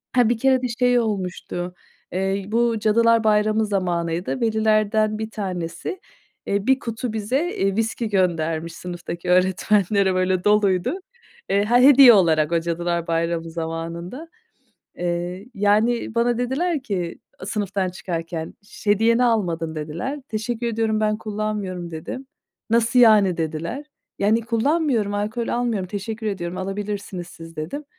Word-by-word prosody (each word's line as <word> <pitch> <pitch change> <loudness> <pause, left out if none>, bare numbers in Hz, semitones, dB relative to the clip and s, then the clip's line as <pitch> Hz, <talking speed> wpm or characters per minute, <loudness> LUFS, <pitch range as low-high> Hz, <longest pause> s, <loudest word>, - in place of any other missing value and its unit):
Ha, 245 -3 +4
bir 240 - +1
kere 260 +1 +3
de 250 - -1
şey 245 -1 +4
olmuştu, 180 -4 -3 0.4
eee, 195 +2 -1
bu 230 +1 +1
Cadılar 230 +1 +3
Bayramı 215 +1 +3
zamanıydı. 175 0 -1
Velilerden 215 -1 +2
bir 220 0 -4
tanesi, 180 - -4 0.5
eee, 200 +2 -1
1 265 0 +4
kutu 230 -2 -4
bize, 220 +5 0 0.2
eee, 195 0 +1
viski 225 +1 -1
göndermiş 165 -4 0
sınıftaki 175 -1 -6
öğretmenlere, 190 +1 +2
böyle, 185 0 +1
doluydu. 205 - +2 0.5
Eee, 200 +1 +3
ha 240 +3 +4
hediye 265 -1 +9
olarak 160 -6 +3
o 170 - +3
Cadılar 170 0 -2
Bayramı 165 0 -1
zamanında. 170 - -5 0.7
Eee, 175 +3 -3
yani, 215 +4 +1
bana 235 0 +2
dediler 280 +5 -1
ki, 180 -8 -3 0.3
sınıftan 195 -2 -2
çıkarken, 165 -2 -5
"Ş 205 0 -4
hediyeni 230 +4 +4
almadın." 170 -8 0
dediler. 165 - -4
"Teşekkür 225 +2 -3
ediyorum, 220 -1 0
ben 215 0 +1
kullanmıyorum." 210 -5 -4
dedim. 170 +12 -7 0.4
"Nasıl 235 +2 +3
yani?" 210 -6 +6
dediler. 170 - -4 0.3
"Yani 215 +3 +3
kullanmıyorum, 230 -2 +1
alkol 215 +3 -2
almıyorum. 235 -6 -1
Teşekkür 220 +3 -5
ediyorum, 180 -4 -3
alabilirsiniz 195 -2 -4
siz." 165 -1 -12
dedim. 165 - -5
205 Hz, 130 wpm, -22 LUFS, 175-230 Hz, 0.7 s, hediye